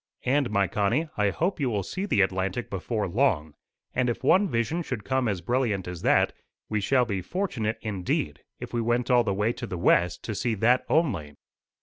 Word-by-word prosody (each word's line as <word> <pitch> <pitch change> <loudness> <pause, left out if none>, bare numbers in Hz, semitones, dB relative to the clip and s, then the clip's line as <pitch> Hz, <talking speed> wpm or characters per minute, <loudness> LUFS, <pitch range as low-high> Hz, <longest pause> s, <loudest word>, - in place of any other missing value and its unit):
And, 135 0 +2
my 100 -2 +2
Connie, 115 - 0
I 105 -1 +2
hope 175 - -1
you 135 -4 +1
will 105 -4 -1
see 190 - -4
the 100 - +3
Atlantic 95 +4 -1
before 105 +2 -2
long; 85 - +1 0.4
and 125 -1 +1
if 120 - -3
one 190 +2 +4
vision 115 +8 0
should 125 -10 -4
come 130 +2 0
as 100 -5 -1
brilliant 110 -2 0
as 90 -2 -6
that, - - +3 0.4
we 105 -1 0
shall 125 +4 +3
be 100 -5 -2
fortunate 115 - -2
indeed, 100 -5 -2 0.2
if - - -8
we 120 - 0
went 120 +2 0
all 120 -1 +5
the 100 - -1
way 105 +4 +1
to 120 0 -6
the 90 - -4
west 90 0 +2
to 110 - -3
see 110 +3 -1
that 120 +5 +3
only." 85 - +1
115 Hz, 205 wpm, -26 LUFS, 100-130 Hz, 0.4 s, all